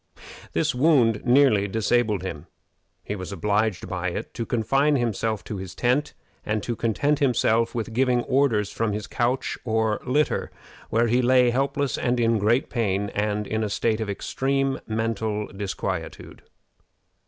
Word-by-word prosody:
This - - +1
wound 125 -5 +3
nearly 125 -6 +4
disabled 110 -1 +1
him. 85 -3 -6 0.6
He 105 - -4
was 95 0 -6
obliged 105 +1 0
by 90 0 -3
it - - -6
to 115 - -4
confine 135 +6 +2
himself 110 -3 -1
to 105 - -6
his 95 -2 -7
tent, 130 +5 0 0.3
and 110 -1 -2
to 120 - -2
content 135 +7 0
himself 115 -4 +2
with 115 -1 -3
giving 125 0 +2
orders 115 -7 +1
from 110 -2 -1
his 105 0 -4
couch 125 +2 -1
or 110 -2 0
litter, 145 +4 0 0.4
where 115 +2 +2
he 120 +2 +2
lay 125 0 +4
helpless 140 +2 -1
and 125 -1 0
in 115 -1 +2
great 115 +6 +2
pain, 100 -4 -1
and 105 +1 -1
in 110 +2 -2
a 105 - -1
state 110 +2 0
of 110 - -3
extreme 135 +6 -1
mental 110 -1 -1
disquietude. 100 -1 -5
115 Hz, 155 wpm, -24 LUFS, 105-125 Hz, 0.6 s, nearly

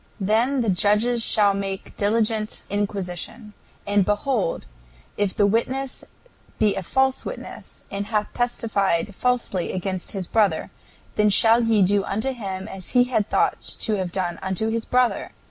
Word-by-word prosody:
"Then 230 +7 +2
the 225 - 0
judges 210 +5 +3
shall 205 -3 +4
make 195 -1 -5
diligent 215 +1 0
inquisition; 205 +2 -4 0.3
and 205 -1 +3
behold, 210 0 -1 0.5
if 205 -2 -1
the 205 - +3
witness 255 +6 -1 0.5
be 210 -2 +3
a - - -2
false 265 +7 +1
witness, - - -8
and 200 +1 -3
hath 210 -2 -1
testified 205 -6 0
falsely 235 -5 0
against 185 0 -3
his 195 -3 -3
brother, 210 +2 +1 0.5
then 210 0 +4
shall 225 +3 +5
ye 225 -3 +3
do 200 +1 +2
unto 220 +8 -2
him 195 -6 -5
as 190 -2 -5
he 245 - +7
had 240 -4 0
thought - - +1 0.2
to 215 -2 +1
have 185 -2 -3
done 175 -2 -2
unto 190 +4 -1
his 225 0 -2
brother... 250 -1 +1
210 Hz, 150 wpm, -23 LUFS, 195-230 Hz, 0.5 s, he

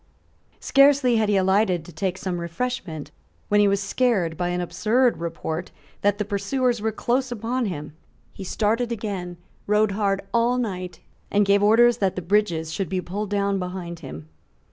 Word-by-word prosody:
Scarcely 275 -3 +4
had 215 -1 +1
he 205 - +3
alighted 190 -3 +2
to 175 - -11
take 180 +3 -2
some 180 -2 -3
refreshment 170 -4 -4 0.4
when 210 - +4
he 205 - +5
was 200 0 +2
scared 200 -5 +1
by 175 +1 -1
an 175 0 -1
absurd 230 +7 +1
report 165 0 -4 0.3
that 205 0 +2
the 210 - -2
pursuers 240 +3 0
were 220 +1 0
close 250 +4 -1
upon 240 +1 -2
him. 150 -5 -6 0.4
He - - -8
started 225 +5 0
again, 195 -6 -4 0.3
rode 210 0 +3
hard 195 -1 0
all 235 +1 +2
night, 185 -7 -4 0.3
and 205 0 +3
gave 200 +1 +4
orders 230 +3 +5
that 195 -5 0
the 185 - -4
bridges 170 -4 +1
should 190 -2 -2
be 185 - -1
pulled 200 +4 -4
down 200 -1 0
behind 180 -2 -5
him. 75 +1 -9
200 Hz, 170 wpm, -24 LUFS, 180-225 Hz, 0.4 s, he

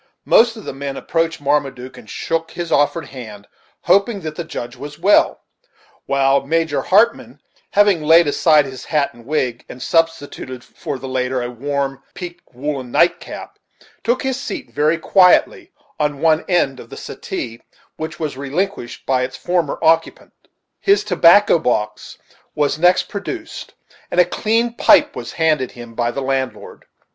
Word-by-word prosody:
Most 230 0 +5
of 215 - -10
the - - -5
men 135 0 -5
approached 165 -1 -1
Marmaduke, 140 -3 -1
and - - -14
shook 165 0 -2
his 175 -1 -6
offered 145 +2 +2
hand, 110 -6 -10 0.3
hoping 200 +3 +2
"that 155 -2 -5
the 170 - -4
Judge 120 -7 -7
was 145 +3 -9
well;" 195 +5 +3 0.7
while 140 0 +2
Major 160 +1 0
Hartmann 210 +5 +2 0.3
having 205 -5 +3
laid 165 +3 +6
aside 150 0 +4
his 130 -2 -9
hat 150 -3 0
and 120 0 -17
wig, 130 -5 -1
and 125 - -9
substituted 145 -5 -1
for 145 -4 -6
the 130 +1 -8
latter 130 -1 -1
a 120 - -4
warm, 135 +2 -3
peaked 175 -1 -8
woollen 130 0 -4
nightcap, 170 +7 -1 0.4
took 240 +2 0
his 265 -1 -1
seat 285 +1 -6
very 155 +3 +1
quietly 190 - +3 0.3
on 145 -2 -1
one 160 0 +2
end 140 -8 +1
of - - -12
the - - -10
settee, 115 -1 -6 0.4
which 160 +2 -6
was 155 -4 -3
relinquished 140 +1 -4
by 130 -1 +1
its 130 +1 -4
former 175 -5 -1
occupant. 165 0 +1 0.5
His 400 +1 +3
tobacco 180 +1 +5
box 105 -7 -2 0.4
was 150 0 0
next 180 +2 +4
produced, 320 - -7 0.3
and 180 - 0
a 180 - +7
clean 225 +6 0
pipe - - +4
was - - -7
handed 155 -6 +1
him 120 -1 -11
by 120 0 0
the 140 +3 -4
landlord. 130 -1 -3
150 Hz, 155 wpm, -19 LUFS, 130-175 Hz, 0.7 s, a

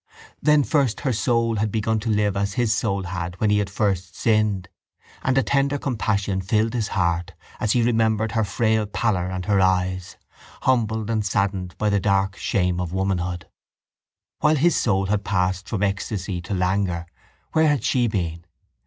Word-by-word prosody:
Then 150 -1 +4
first 135 -6 +1
her 130 -3 0
soul 115 0 +1
had 105 +1 0
begun 110 +1 0
to 115 +1 -4
live 105 -2 +1
as 100 0 -1
his 115 -1 +1
soul 100 -3 -1
had 90 -1 -5
when 105 -1 +2
he 105 - +3
had 100 -1 -1
first 100 -3 -1
sinned, 105 -4 +1 0.5
and 130 +1 +1
a 135 - +4
tender 140 +1 +1
compassion 105 -7 -1
filled 110 +4 +1
his 115 -4 -1
heart 85 -1 0 0.3
as 110 - +1
he 120 - +3
remembered 110 -2 +1
her 110 -2 +1
frail 110 +1 +1
pallor 100 -4 0
and 90 -1 -4
her 100 -1 +2
eyes, 95 -1 0 0.5
humbled 110 -3 +1
and 110 -2 0
saddened 95 -2 -1
by 105 -1 +1
the 100 - +2
dark 95 -1 +1
shame 90 -2 0
of 85 -2 -4
womanhood. 90 -3 -2 0.9
While 150 +1 +3
his 165 +4 +3
soul 95 -4 +1
had 100 +1 0
passed 95 -1 -1
from 105 -3 -1
ecstasy 95 -2 -2
to 95 +3 -4
languor 90 -2 0 0.5
where 160 0 +3
had 145 -6 +1
she 125 -2 +2
been? 85 -6 -3
100 Hz, 175 wpm, -23 LUFS, 95-110 Hz, 0.9 s, Then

